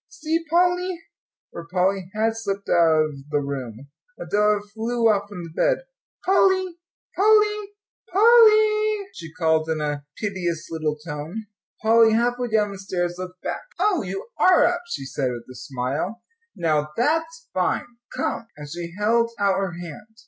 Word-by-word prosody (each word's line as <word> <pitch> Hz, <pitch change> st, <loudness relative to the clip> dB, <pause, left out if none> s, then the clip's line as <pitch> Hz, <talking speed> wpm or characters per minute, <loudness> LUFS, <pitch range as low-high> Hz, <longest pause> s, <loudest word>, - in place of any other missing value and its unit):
"See, 325 Hz, +1 st, -2 dB
Pol 355 Hz, +2 st, +4 dB
ly!" 360 Hz, 0 st, -4 dB, 0.5 s
for 170 Hz, -1 st, -8 dB
Polly 185 Hz, +1 st, 0 dB
had 225 Hz, +1 st, +1 dB
slipped 200 Hz, -3 st, -4 dB
out 160 Hz, -2 st, +4 dB
of 155 Hz, -, -5 dB, 0.2 s
the 150 Hz, -1 st, +1 dB
room. 140 Hz, -2 st, -6 dB, 0.3 s
Adela 205 Hz, +4 st, +2 dB
flew 230 Hz, +1 st, 0 dB
off 205 Hz, -2 st, +1 dB
from 180 Hz, -4 st, -7 dB
the 165 Hz, -, -9 dB
bed. -, -, +2 dB, 0.4 s
"Polly 375 Hz, -2 st, +3 dB, 0.4 s
Polly, 420 Hz, 0 st, +3 dB, 0.4 s
Pol 390 Hz, +4 st, +2 dB, 0.2 s
ly!" 430 Hz, -1 st, +3 dB
she 165 Hz, -2 st, -9 dB
called, 160 Hz, -1 st, +1 dB
in 160 Hz, -1 st, 0 dB
a 145 Hz, -1 st, -2 dB
piteous 175 Hz, -6 st, -3 dB
little 155 Hz, -2 st, -1 dB
tone. 155 Hz, +7 st, -6 dB, 0.4 s
Polly, 225 Hz, 0 st, +5 dB
halfway 245 Hz, +2 st, +1 dB
down 215 Hz, -2 st, +1 dB
the 195 Hz, -, -8 dB
stairs, 175 Hz, -2 st, -3 dB
looked 185 Hz, 0 st, -8 dB
back. -, -, -3 dB, 0.2 s
"Oh, 380 Hz, -1 st, +2 dB
you 195 Hz, -, -5 dB
are 370 Hz, -, +6 dB
up," 350 Hz, 0 st, +1 dB
she 345 Hz, -, -5 dB
said, 135 Hz, -1 st, -2 dB
with 120 Hz, -1 st, -5 dB
a -, -, -11 dB
smile. 140 Hz, -, -4 dB, 0.3 s
"Now 150 Hz, -2 st, 0 dB
that's 325 Hz, -, 0 dB
fine; -, -, 0 dB, 0.3 s
come." 230 Hz, -, -3 dB
And 150 Hz, 0 st, -8 dB
she 170 Hz, +3 st, -7 dB
held 230 Hz, +3 st, +2 dB
out 200 Hz, -1 st, +2 dB
her 195 Hz, -3 st, -2 dB
hand. 175 Hz, +6 st, -10 dB
200 Hz, 160 wpm, -23 LUFS, -, 0.5 s, are